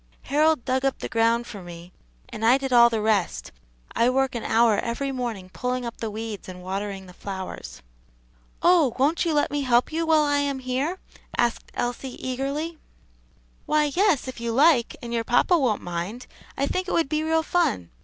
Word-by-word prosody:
"Harold 305 -1 +2
dug 260 0 0
up 270 -1 +1
the - - -5
ground 230 +1 +2
for 205 -5 -9
me, 175 0 -11 0.4
and 220 - -7
I 240 +4 +6
did 270 -1 -3
all 235 -1 +8
the 225 -2 -1
rest, 205 - 0 0.4
I 235 - +3
work 265 0 +1
an 235 - -4
hour 225 -2 +3
every 270 +4 -2
morning 230 -8 -4
pulling 250 0 -2
up 235 - -6
the 225 - -4
weeds 215 -2 -6
and 180 0 -9
watering 195 +1 -4
the 180 - -13
flowers." 190 - -7 0.8
"Oh? 335 -9 +4
won't 295 +7 +2
you 330 - +1
let 290 - +1
me 290 0 -1
help 250 0 +2
you 325 +1 -1
while 315 -1 +5
I 290 -1 +2
am 285 -1 -1
here?" 260 +7 -2 0.4
asked 240 -1 0
Elsie, 245 +1 -3
eagerly. 280 +5 -3 0.9
"Why, 300 -1 +2
yes, 370 -9 +2
if 260 - -7
you 235 0 -2
like, 275 -2 +4
and 235 0 -5
your 230 -1 0
papa 245 +10 +3
won't 255 -10 +1
mind 175 +8 -5 0.3
I 275 - +1
think 370 +6 -2
it - - -2
would 330 -3 +2
be 305 +2 -1
real 320 0 +1
fun. 205 - 0
250 Hz, 195 wpm, -25 LUFS, 225-290 Hz, 0.9 s, all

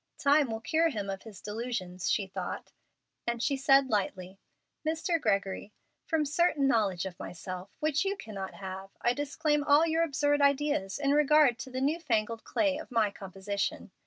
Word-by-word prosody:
"Time 285 -1 +4
will 225 0 -4
cure 325 +6 +2
him 205 -8 -3
of 195 - -6
his 215 -4 -12
delusions," 210 -5 -3
she 205 - +1
thought, 190 - -6 0.6
and 235 0 -1
she 280 - +1
said, 270 0 +4
lightly, 190 -2 -2 0.4
"Mr. 325 +1 0
Gregory, 200 -1 -1 0.3
from 320 -3 +1
certain 295 -1 +2
knowledge 205 -8 +1
of 180 -2 -7
myself 185 +2 -7
which 305 0 +1
you 395 +1 -1
cannot 195 - -7
have 190 0 -7
I 240 - +3
disclaim 290 +2 0
all 290 +2 +5
your 325 0 +1
absurd 290 -2 +1
ideas 280 -8 +2
in 280 -1 +1
regard 295 -4 +5
to 260 - -6
the 260 0 -4
new 300 +5 +1
fangled 230 -6 -1
clay 295 -2 0
of - - -9
my 225 -5 +2
composition. 195 +1 -4
255 Hz, 170 wpm, -30 LUFS, 200-295 Hz, 0.6 s, all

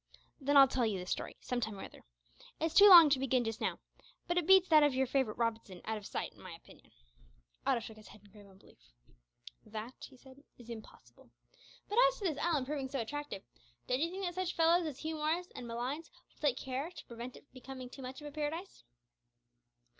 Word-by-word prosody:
"Then 285 0 +2
I'll 275 -1 +9
tell 255 -3 0
you 205 -3 -1
the 180 - -6
story - - -4
some 250 -1 -2
time 220 -3 -3
or - - -7
other. - - -12 0.6
It's 325 0 -1
too 405 +3 +9
long 335 -5 +10
to 270 - +3
begin 260 -2 +1
just 225 -1 -4
now, - - -1 0.5
but 345 - -1
it 350 -2 +1
beats 380 -1 +7
that 310 -2 +7
of 290 -3 +3
your 265 0 +2
favourite 260 -4 0
Robinson 225 -5 -2
out 220 - -2
of 205 - -9
sight - - -4
in - - -18
my 185 -2 -9
opinion." 165 - -19 0.8
Otto 235 - +2
shook 220 0 -10
his 215 -2 -14
head 210 - -15
in 205 - -20
grave 205 -1 -15
unbelief. 195 0 -20 0.8
"That," 220 +3 -7 0.2
he 260 - -18
said, 265 +2 -17
"is 240 -1 -11
impossible. 120 - -13 0.6
But 420 +4 +1
as - - -8
to - - -9
this 320 -7 -1
island 315 -6 +1
proving 275 -1 -3
so 275 0 -3
attractive, 290 -2 -5 0.4
don't 250 - 0
you 335 - +1
think 380 +2 -6
that 350 - -2
such 370 0 -3
fellows 335 +1 +3
as 285 -4 -6
Hugh 315 +2 -4
Morris 320 +4 -1
and 245 - -7
Malines 250 +7 -4 0.2
will - - -29
take 280 -4 +1
care 265 +5 -4
to 360 - -12
prevent 235 +1 -8
it - - -17
becoming 260 0 -9
too 260 +2 -11
much 260 +2 -8
of 295 - -7
a - - -8
paradise?" 305 - -5
265 Hz, 220 wpm, -33 LUFS, 230-315 Hz, 0.8 s, long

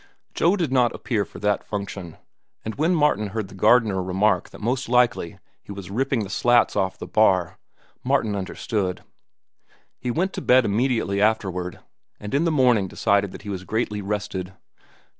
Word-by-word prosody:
Joe 175 +4 +3
did 170 -9 -1
not 125 -3 +2
appear 105 -5 -1
for - - -13
that 105 0 +1
function, 100 -4 -6 0.5
and 110 - -3
when 160 +5 +1
Martin 145 -10 +2
heard 100 -1 -4
the - - -13
gardener 105 -1 +3
remark 95 +1 +1
that - - -13
most 125 +3 -2
likely 120 -8 +2 0.2
he - - -12
was 100 -1 -8
ripping 130 +2 0
the 95 - -7
slats 120 0 +3
off 95 -2 0
the - - -7
bar, 95 -5 +2 0.4
Martin 125 -6 +1
understood. 95 -1 -3 1.0
He 125 - -4
went 180 +10 0
to - - -4
bed 125 -1 +4
immediately 110 -2 0
afterward, 95 -5 0 0.4
and 105 0 -7
in 145 +5 +2
the 165 - +2
morning 125 -9 +3
decided 100 +1 +1
that - - -11
he 105 - -7
was 95 -2 -4
greatly 105 0 -2
rested. 95 -2 -4
105 Hz, 170 wpm, -23 LUFS, 95-125 Hz, 1.0 s, bed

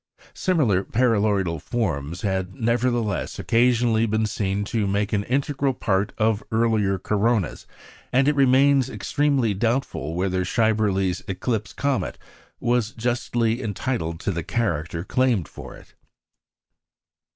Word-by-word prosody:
Similiar 135 - +1
paraboloidal 100 - +1
forms 85 - -2
had, 95 -2 -2
nevertheless, 120 -2 0
occasionally 115 -1 +2
been 110 +1 +1
seen 100 -1 -1
to 110 -2 -1
make 100 +2 -1
an 100 -1 +1
integral 135 0 0
part 100 -3 0
of 110 -1 +1
earlier 110 -4 +2
coronas; 105 +2 0 0.4
and 135 +2 +3
it 150 - +4
remains 135 0 +4
extremely 140 -6 0
doubtful 115 - -1
whether 95 0 0
Schaeberle's 100 -3 +1
"eclipse 100 +1 -2
comet" 140 -2 -1 0.4
was 120 -3 0
justly 120 0 -1
entitled 105 -7 -3
to - - -1
the 85 -2 -3
character 85 -5 -2
claimed 120 - +1
for - - -10
it. - - -17
110 Hz, 120 wpm, -23 LUFS, 95-125 Hz, 0.4 s, it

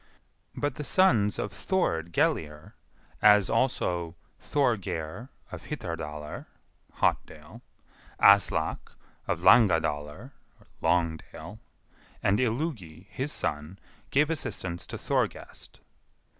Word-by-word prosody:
But 145 -2 -1
the 150 - -6
sons 120 - +3
of 105 - -3
Thord 85 - -1
Gellir, 75 -2 -1 0.5
as 105 -2 +5
also 85 -10 0 0.2
Thorgeir, 115 - -2 0.2
of - - -9
Hitardalr 75 - -6 0.5
(Hotdale), - - -2 0.6
Aslak, 100 -1 +3 0.3
of - - -1
Langadalr 80 - +3 0.5
(Longdale), 85 -2 -2 0.6
and 100 +3 +2
Illugi, 110 - -3
his 135 +3 -3
son, 75 +4 -3 0.3
gave 150 +3 +2
assistance 95 - -3
to - - -6
Thorgest. - - -3
100 Hz, 90 wpm, -28 LUFS, 80-130 Hz, 0.6 s, as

